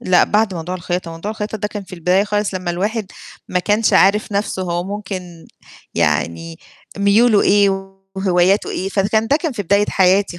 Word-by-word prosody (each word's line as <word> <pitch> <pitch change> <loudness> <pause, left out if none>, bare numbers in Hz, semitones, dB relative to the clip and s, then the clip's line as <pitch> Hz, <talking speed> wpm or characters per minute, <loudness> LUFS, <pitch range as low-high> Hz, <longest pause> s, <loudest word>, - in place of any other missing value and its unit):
لأ، 180 -1 +4
بعد 210 -2 +1
موضوع 170 +2 -5
الخياطة، 175 -1 -4
موضوع 165 +5 -6
الخياطة 215 0 -5
ده 210 - -2
كان 210 -1 -6
في 190 0 -16
البداية 180 +3 +2
خالص 205 -1 -1
لمّا 180 -1 -3
الواحد 205 +5 -2 0.4
ما 180 - 0
كانش 210 +4 +1
عارف 205 +2 +3
نفْسُه 200 -1 -2
هو 175 -1 -2
ممكن 185 -4 -7 0.5
يعني 85 0 -1 0.4
ميولُه 205 +2 +4
إيه 195 -1 +2 0.2
وهواياتُه 190 +1 +2
إيه؟ 190 - -3
فكان 205 +3 +1
ده 280 - +3
كان 320 -1 -3
في 210 - -4
بداية 200 +3 +2
حياتي 190 -1 +2
195 Hz, 175 wpm, -18 LUFS, 180-210 Hz, 0.5 s, لأ